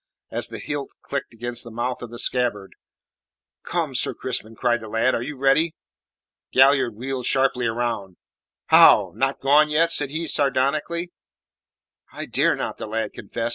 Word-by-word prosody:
As -, -, 0 dB
the -, -, -6 dB
hilt 145 Hz, -1 st, -5 dB
clicked 140 Hz, -, -4 dB
against 120 Hz, +1 st, -3 dB
the 120 Hz, -, -8 dB
mouth 120 Hz, +2 st, -3 dB
of 120 Hz, -, -7 dB
the 120 Hz, -, -9 dB
scabbard: 120 Hz, -6 st, -1 dB, 0.9 s
"Come, 165 Hz, -5 st, -2 dB
Sir -, -, 0 dB
Crispin!" 115 Hz, -3 st, -3 dB
cried 120 Hz, 0 st, 0 dB
the 110 Hz, -, -8 dB
lad. 115 Hz, +4 st, +1 dB
"Are -, -, -1 dB
you 140 Hz, +3 st, -6 dB
ready?" 140 Hz, +5 st, +2 dB, 0.8 s
Galliard 135 Hz, -3 st, +4 dB
wheeled 130 Hz, +2 st, -4 dB
sharply 130 Hz, -2 st, +2 dB
round. 115 Hz, -5 st, -3 dB, 0.5 s
"How? -, -, +7 dB
Not 135 Hz, +1 st, -1 dB
gone 150 Hz, +3 st, +4 dB
yet?" 165 Hz, +2 st, +2 dB
said 145 Hz, -4 st, +1 dB
he 160 Hz, +4 st, -3 dB
sardonically. 145 Hz, +5 st, 0 dB, 1.0 s
"I -, -, -6 dB
dare -, -, +2 dB
not," -, -, -4 dB
the -, -, -6 dB
lad 110 Hz, -1 st, -3 dB
confessed. 115 Hz, +3 st, -4 dB
130 Hz, 160 wpm, -23 LUFS, 115-140 Hz, 1.0 s, How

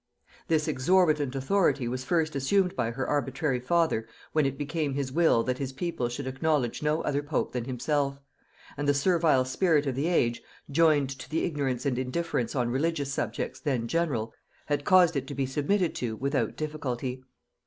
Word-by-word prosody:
This 155 Hz, -1 st, +1 dB
exorbitant 150 Hz, -2 st, +2 dB
authority 135 Hz, -2 st, +1 dB
was 130 Hz, +2 st, -3 dB
first 160 Hz, +1 st, 0 dB
assumed 180 Hz, +7 st, +2 dB
by 115 Hz, -, 0 dB
her 130 Hz, +3 st, -3 dB
arbitrary 135 Hz, -1 st, 0 dB
father 160 Hz, -5 st, +1 dB, 0.2 s
when 155 Hz, -3 st, +2 dB
it 135 Hz, 0 st, -4 dB
became 150 Hz, -1 st, -2 dB
his 140 Hz, -2 st, -2 dB
will 160 Hz, -6 st, +3 dB
that 130 Hz, +1 st, -2 dB
his 135 Hz, -1 st, -3 dB
people 135 Hz, -5 st, -2 dB
should 125 Hz, +3 st, -5 dB
acknowledge 135 Hz, -1 st, 0 dB
no 150 Hz, +1 st, 0 dB
other 145 Hz, 0 st, 0 dB
pope 145 Hz, 0 st, -2 dB
than 125 Hz, -2 st, -3 dB
himself; 140 Hz, +2 st, -1 dB, 0.6 s
and 145 Hz, 0 st, -2 dB
the 145 Hz, -, +4 dB
servile 160 Hz, -4 st, +3 dB
spirit 150 Hz, +2 st, +2 dB
of 135 Hz, -, -1 dB
the 140 Hz, +5 st, -1 dB
age, 120 Hz, -9 st, +1 dB, 0.3 s
joined 150 Hz, -3 st, +3 dB
to -, -, -9 dB
the 160 Hz, -, 0 dB
ignorance 140 Hz, -6 st, -1 dB
and 130 Hz, -3 st, 0 dB
indifference 130 Hz, -2 st, -2 dB
on 120 Hz, -2 st, 0 dB
religious 140 Hz, 0 st, -1 dB
subjects 115 Hz, -4 st, -3 dB
then 130 Hz, -6 st, -1 dB
general, 135 Hz, -8 st, -1 dB, 0.3 s
had 145 Hz, -1 st, -1 dB
caused 180 Hz, -3 st, +5 dB
it 135 Hz, -1 st, -2 dB
to 140 Hz, -, -6 dB
be 135 Hz, -, 0 dB
submitted 155 Hz, +7 st, 0 dB
to 115 Hz, -3 st, -3 dB
without 135 Hz, -2 st, -1 dB
difficulty. 130 Hz, -4 st, -4 dB
140 Hz, 175 wpm, -28 LUFS, 130-160 Hz, 0.6 s, caused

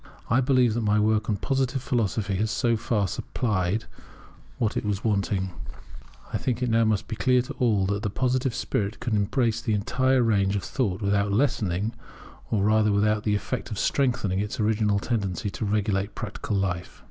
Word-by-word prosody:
I 125 Hz, +3 st, +4 dB
believe 125 Hz, -3 st, +3 dB
that 120 Hz, -, -1 dB
my 105 Hz, -1 st, +2 dB
work 110 Hz, +1 st, +1 dB
on 105 Hz, -, +2 dB
Positive 135 Hz, +3 st, 0 dB
Philosophy 110 Hz, -5 st, -1 dB
has 110 Hz, +3 st, 0 dB
so 115 Hz, +2 st, +1 dB
far 110 Hz, -2 st, 0 dB
supplied 105 Hz, +1 st, -1 dB, 0.7 s
what 110 Hz, -3 st, 0 dB
was 105 Hz, -1 st, -2 dB
wanting. 100 Hz, -3 st, 0 dB, 0.8 s
I -, -, 0 dB
think 125 Hz, -1 st, -1 dB
it 125 Hz, -, 0 dB
must 110 Hz, -2 st, +2 dB
now -, -, -32 dB
be 110 Hz, -, -4 dB
clear 125 Hz, +2 st, +3 dB
to -, -, -7 dB
all 110 Hz, -6 st, +2 dB
that 100 Hz, +1 st, -1 dB
the 105 Hz, -, -1 dB
Positive 130 Hz, +3 st, 0 dB
spirit 100 Hz, +1 st, -2 dB
can 120 Hz, -3 st, -1 dB
embrace 110 Hz, +3 st, +1 dB
the 110 Hz, -, 0 dB
entire 130 Hz, +5 st, +2 dB
range 100 Hz, -3 st, +2 dB
of 100 Hz, -, -2 dB
thought 105 Hz, -5 st, -2 dB
without 100 Hz, 0 st, +1 dB
lessening, 105 Hz, -3 st, 0 dB, 0.6 s
or 105 Hz, -3 st, +1 dB
rather 105 Hz, 0 st, +3 dB
with 100 Hz, 0 st, +2 dB, 0.2 s
the 105 Hz, -1 st, +1 dB
effect 115 Hz, +6 st, -3 dB
of 110 Hz, -, -5 dB
strengthening 115 Hz, -9 st, +1 dB
its 105 Hz, +3 st, -3 dB
original 105 Hz, -1 st, +2 dB
tendency 100 Hz, -3 st, -2 dB
to 110 Hz, -, -4 dB
regulate 100 Hz, -1 st, 0 dB
practical 105 Hz, -1 st, -3 dB
life. 90 Hz, -2 st, -3 dB
105 Hz, 180 wpm, -26 LUFS, 100-120 Hz, 0.8 s, I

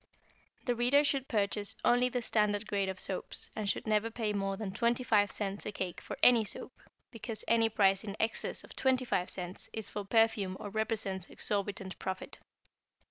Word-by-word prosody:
The 245 Hz, -, +2 dB
reader 245 Hz, +5 st, +4 dB
should 275 Hz, -2 st, 0 dB
purchase 205 Hz, -1 st, +1 dB
only 245 Hz, +1 st, +4 dB
the 245 Hz, -1 st, -2 dB
standard 210 Hz, -1 st, +1 dB
grade 200 Hz, -2 st, -1 dB
of 190 Hz, -1 st, -5 dB
soaps, 190 Hz, -, 0 dB
and 210 Hz, -2 st, -2 dB
should -, -, -1 dB
never 215 Hz, 0 st, +1 dB
pay 225 Hz, -2 st, -2 dB
more 195 Hz, -1 st, -1 dB
than 205 Hz, -2 st, -4 dB
25 230 Hz, -2 st, +2 dB
cents 200 Hz, -1 st, -3 dB
a -, -, -2 dB
cake 185 Hz, -3 st, -4 dB
for -, -, -7 dB
any 240 Hz, -3 st, +7 dB
soap, 210 Hz, -, -5 dB, 0.4 s
because 225 Hz, -1 st, -5 dB
any 230 Hz, -1 st, +4 dB
price 195 Hz, -2 st, +3 dB
in 205 Hz, -1 st, -6 dB
excess 225 Hz, -, -1 dB
of -, -, -13 dB
25 255 Hz, -8 st, +1 dB
cents 180 Hz, +4 st, -5 dB
is 220 Hz, -2 st, -3 dB
for 205 Hz, -, -4 dB
perfume 205 Hz, -3 st, +2 dB
or 205 Hz, -, -6 dB
represents 210 Hz, -4 st, -1 dB
exorbitant 200 Hz, -2 st, -3 dB
profit. 190 Hz, 0 st, -5 dB
210 Hz, 175 wpm, -32 LUFS, 195-230 Hz, 0.4 s, any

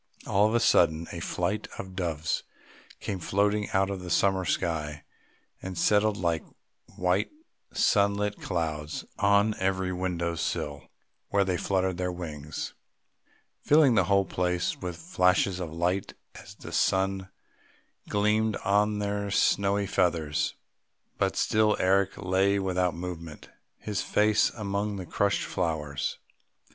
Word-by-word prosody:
All 100 Hz, +2 st, +3 dB
of 110 Hz, -, 0 dB
a -, -, +4 dB
sudden 80 Hz, -8 st, +3 dB
a 85 Hz, -, -5 dB
flight 95 Hz, +5 st, -2 dB
of 95 Hz, -1 st, -7 dB
doves 80 Hz, -4 st, -1 dB, 0.6 s
came 95 Hz, -, -4 dB
floating 105 Hz, +4 st, +1 dB
out 95 Hz, +1 st, +1 dB
of 95 Hz, -, -3 dB
the 90 Hz, -1 st, -7 dB
summer 95 Hz, 0 st, +2 dB
sky 75 Hz, -2 st, -2 dB, 0.6 s
and 95 Hz, -1 st, -6 dB
settled 105 Hz, +4 st, +3 dB
like 85 Hz, -3 st, 0 dB, 0.5 s
white 90 Hz, +2 st, +1 dB, 0.4 s
sunlit 100 Hz, -1 st, +2 dB
clouds 80 Hz, -4 st, -3 dB
on 100 Hz, +1 st, +4 dB
every 95 Hz, -1 st, 0 dB
window 90 Hz, -2 st, -1 dB
sill, 75 Hz, -3 st, -3 dB, 0.4 s
where 100 Hz, 0 st, +3 dB
they 95 Hz, -1 st, 0 dB
fluttered 95 Hz, 0 st, 0 dB
their 90 Hz, 0 st, -1 dB
wings, 75 Hz, -4 st, -6 dB, 0.9 s
filling 145 Hz, -4 st, +5 dB
the 95 Hz, -5 st, +3 dB
whole 100 Hz, +1 st, +3 dB
place 90 Hz, -1 st, -1 dB
with 90 Hz, -2 st, -5 dB
flashes 90 Hz, +2 st, +2 dB
of 85 Hz, -4 st, -4 dB
light, 90 Hz, +4 st, -1 dB, 0.2 s
as 100 Hz, -, -12 dB
the -, -, -10 dB
sun 95 Hz, 0 st, +1 dB, 0.8 s
gleamed 105 Hz, +1 st, +2 dB
on 105 Hz, +2 st, +3 dB
their 100 Hz, 0 st, -2 dB
snowy 100 Hz, 0 st, +2 dB
feathers. 80 Hz, -6 st, 0 dB, 0.6 s
But -, -, +1 dB
still 110 Hz, 0 st, +2 dB
Eric 95 Hz, +1 st, +2 dB
lay 95 Hz, +2 st, +2 dB
without 90 Hz, -2 st, 0 dB
movement, 85 Hz, -3 st, -7 dB, 0.3 s
his 105 Hz, -2 st, -3 dB
face 105 Hz, 0 st, +3 dB
among 100 Hz, 0 st, -2 dB
the 95 Hz, -2 st, -5 dB
crushed -, -, 0 dB
flowers. 75 Hz, -4 st, -2 dB
95 Hz, 130 wpm, -28 LUFS, 85-100 Hz, 0.9 s, filling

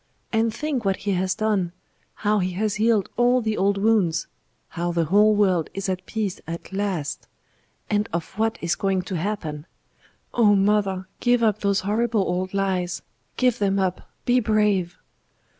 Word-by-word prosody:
And 225 Hz, 0 st, +2 dB
think 285 Hz, -1 st, -2 dB
what 195 Hz, -1 st, +1 dB
He 205 Hz, -, +1 dB
has 185 Hz, 0 st, 0 dB
done 205 Hz, -6 st, 0 dB, 0.4 s
how 210 Hz, 0 st, +1 dB
He 185 Hz, -1 st, -1 dB
has 210 Hz, +2 st, -1 dB
healed 215 Hz, -2 st, +2 dB
all 245 Hz, +1 st, +4 dB
the 220 Hz, -2 st, -1 dB
old 200 Hz, 0 st, +1 dB
wounds 200 Hz, -5 st, +2 dB, 0.4 s
how 175 Hz, +1 st, -2 dB
the 170 Hz, -1 st, +1 dB
whole 210 Hz, +5 st, +5 dB
world 185 Hz, -6 st, +2 dB
is 195 Hz, 0 st, -3 dB
at 185 Hz, -1 st, -3 dB
peace 210 Hz, -5 st, -3 dB
at 170 Hz, +3 st, -7 dB
last 190 Hz, -7 st, -2 dB, 0.6 s
and 210 Hz, 0 st, 0 dB
of 170 Hz, 0 st, -3 dB
what 225 Hz, +1 st, +1 dB
is 170 Hz, 0 st, +1 dB
going 190 Hz, -1 st, 0 dB
to 190 Hz, 0 st, -5 dB
happen. 165 Hz, -5 st, -3 dB, 0.7 s
Oh! 210 Hz, -4 st, +5 dB
mother, 195 Hz, -2 st, +1 dB
give 245 Hz, -1 st, +2 dB
up 215 Hz, -2 st, +2 dB
those 200 Hz, -2 st, +1 dB
horrible 220 Hz, +2 st, +1 dB
old 185 Hz, 0 st, -1 dB
lies; 190 Hz, -3 st, -1 dB, 0.3 s
give 250 Hz, -2 st, +2 dB
them 200 Hz, -1 st, +1 dB
up; 185 Hz, -2 st, -1 dB, 0.2 s
be 250 Hz, +1 st, +4 dB
brave." 210 Hz, -5 st, +1 dB
200 Hz, 165 wpm, -24 LUFS, 185-215 Hz, 0.7 s, whole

